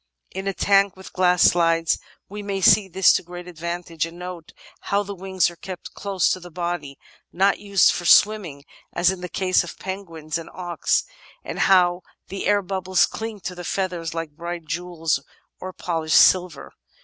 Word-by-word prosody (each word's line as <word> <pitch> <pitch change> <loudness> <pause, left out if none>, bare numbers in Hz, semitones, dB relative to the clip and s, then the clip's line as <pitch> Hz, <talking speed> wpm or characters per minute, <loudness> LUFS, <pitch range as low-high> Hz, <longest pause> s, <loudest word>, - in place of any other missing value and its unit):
In 190 +1 -5
a 195 - 0
tank 200 0 +3
with 190 - -12
glass 180 -1 +3
sides 165 -1 +2 0.3
we 210 +1 -7
may 200 -1 -3
see 195 +2 +5
this 190 +1 +4
to - - +1
great 175 +1 -10
advantage, 170 -1 -4
and 165 +1 -12
note 180 -2 -8 0.3
how 200 +1 -1
the 200 0 -6
wings 190 -1 0
are - - -14
kept 185 +1 -9
close 195 -3 0
to 185 - -1
the 175 0 -11
body 170 -5 -4 0.2
— - - -39
not 195 +3 +2
used 200 -2 +4
for 175 - -4
swimming 180 -8 +4 0.3
as 175 +1 +3
in 190 -1 -7
the 180 - -6
case 185 0 +1
of 175 - -9
penguins 165 -5 -5
and 165 - -10
auks 175 -3 0 0.2
— - - -25
and - - -5
how 180 -1 +4 0.3
the 195 - -4
air 205 -1 +3
bubbles 185 -1 +1
cling 220 -2 -6
to 180 - -5
the 175 0 -8
feathers 175 -3 -3
like 165 -2 -4
bright 170 +2 -6
jewels 170 -2 -2 0.4
or 185 - -6
polished 165 -4 0
silver. 180 -5 +3
180 Hz, 185 wpm, -23 LUFS, 170-190 Hz, 0.4 s, see